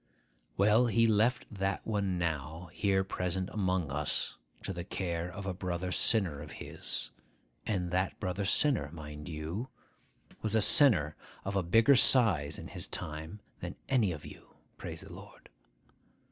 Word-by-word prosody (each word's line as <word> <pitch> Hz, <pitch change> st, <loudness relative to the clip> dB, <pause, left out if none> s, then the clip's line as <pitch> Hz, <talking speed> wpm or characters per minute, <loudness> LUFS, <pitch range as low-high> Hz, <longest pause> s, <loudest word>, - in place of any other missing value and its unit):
'Well, 105 Hz, +5 st, +4 dB
he 115 Hz, 0 st, +2 dB
left 110 Hz, +3 st, +2 dB
that 95 Hz, -1 st, -3 dB
one 100 Hz, -4 st, -1 dB
now 80 Hz, +1 st, -4 dB
here 95 Hz, -1 st, +1 dB
present 95 Hz, 0 st, -3 dB
among 95 Hz, -7 st, -1 dB
us 75 Hz, +1 st, -2 dB, 0.3 s
to 95 Hz, -, -4 dB
the 85 Hz, -1 st, -6 dB
care 85 Hz, -2 st, -4 dB
of 100 Hz, +1 st, -8 dB
a 95 Hz, -, -3 dB
brother 90 Hz, 0 st, -4 dB
sinner 90 Hz, -9 st, +1 dB
of 75 Hz, -1 st, -10 dB
his -, -, -5 dB, 0.6 s
(and 90 Hz, -5 st, -2 dB
that 95 Hz, +1 st, -1 dB
brother 95 Hz, 0 st, -3 dB
sinner, 115 Hz, -, +2 dB
mind 75 Hz, -1 st, -9 dB
you, 85 Hz, +10 st, -5 dB, 0.7 s
was 110 Hz, 0 st, -1 dB
a -, -, +4 dB
sinner 95 Hz, -, +7 dB, 0.3 s
of 100 Hz, +1 st, -4 dB
a 95 Hz, -, +2 dB
bigger 115 Hz, +10 st, +4 dB
size 100 Hz, -, +6 dB
in -, -, -9 dB
his -, -, -4 dB
time 80 Hz, +6 st, -6 dB, 0.2 s
than -, -, -7 dB
any 120 Hz, -8 st, +2 dB
of 75 Hz, -3 st, -8 dB
you; -, -, -14 dB, 0.2 s
praise -, -, -7 dB
the -, -, -12 dB
Lord!) -, -, -14 dB
95 Hz, 155 wpm, -30 LUFS, 85-105 Hz, 0.7 s, sinner